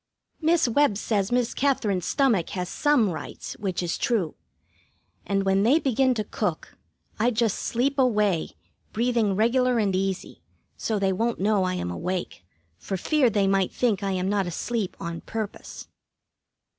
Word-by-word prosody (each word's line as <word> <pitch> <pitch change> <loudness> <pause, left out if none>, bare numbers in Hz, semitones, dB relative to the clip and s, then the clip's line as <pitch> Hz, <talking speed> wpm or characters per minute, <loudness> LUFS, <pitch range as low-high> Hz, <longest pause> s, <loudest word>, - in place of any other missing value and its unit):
Miss 325 -2 +3
Webb 240 -3 +2
says 205 -2 -1
Miss 245 -1 +1
Katherine's 210 -10 0
stomach 235 -11 +2
has 180 0 -3
some 285 -10 +2
rights, 155 -3 -7
which 185 -3 -2
is 170 - -2
true; 210 - 0 0.9
and 195 0 +1
when 195 0 +2
they 245 +9 +5
begin 265 -3 +2
to 215 - -1
cook, - - -3 0.4
I 230 +3 +3
just 225 -3 0
sleep 275 +4 0
away, 210 -9 +1 0.4
breathing 230 -3 +1
regular 245 +3 +2
and 200 -4 +1
easy, 190 0 -3 0.3
so 220 - -2
they 195 -1 +1
won't 230 +5 -1
know 200 -1 +2
I 185 0 -1
am 90 - -3
awake, 180 - -4 0.4
for 195 - -4
fear 275 - +2
they 205 -2 +1
might 195 -1 +2
think 225 -5 0
I 195 -1 -1
am 185 0 -1
not 200 -2 0
asleep 205 +3 -3
on 170 -1 -5
purpose. 220 -2 -6
210 Hz, 155 wpm, -25 LUFS, 190-245 Hz, 0.9 s, they